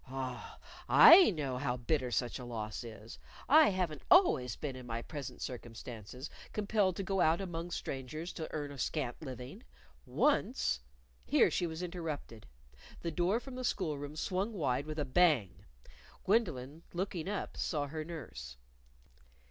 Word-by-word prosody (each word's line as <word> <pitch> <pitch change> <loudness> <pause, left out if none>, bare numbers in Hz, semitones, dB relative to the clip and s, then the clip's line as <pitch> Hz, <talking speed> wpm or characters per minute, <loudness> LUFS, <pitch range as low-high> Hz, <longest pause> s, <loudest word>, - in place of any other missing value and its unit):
Ah, 130 -1 -5 0.3
I 360 +2 +10
know 140 -9 -2
how 125 -2 -1
bitter 130 +1 0
such 120 +1 -1
a - - -7
loss 110 -3 -5
is! 110 -1 -10 0.3
I 310 +3 +7
haven't 180 -6 -2
always 130 - +5
been 140 -4 -5
in 125 -1 -9
my 115 0 -3
present 145 -4 -7
circumstances, 120 +1 -7 0.3
compelled 205 -3 +1
to 195 - -3
go 195 -1 0
out 160 +1 +4
among 175 -3 -4
strangers 155 +3 -5
to 160 - -5
earn 145 -2 -4
a 140 - -9
scant 135 -3 -2
living. 130 -4 -8 0.5
Once - - +1 0.2
" - - -33
Here - - +4
she 175 - 0
was 160 +2 -5
interrupted. 160 - -5 0.5
The 170 - -2
door 180 +7 +1
from 265 +1 -10
the 255 0 -5
school 180 -10 0
room 145 +1 -7
swung 190 +7 -1
wide 145 -6 -1
with 155 0 -5
a 150 - 0
bang. 140 - +2 0.6
Gwendolyn, 160 - 0
looking 180 -1 -3
up, 205 - -3
saw 150 -4 -1
her 155 +2 -5
nurse. 65 - -8
150 Hz, 155 wpm, -33 LUFS, 125-175 Hz, 0.6 s, I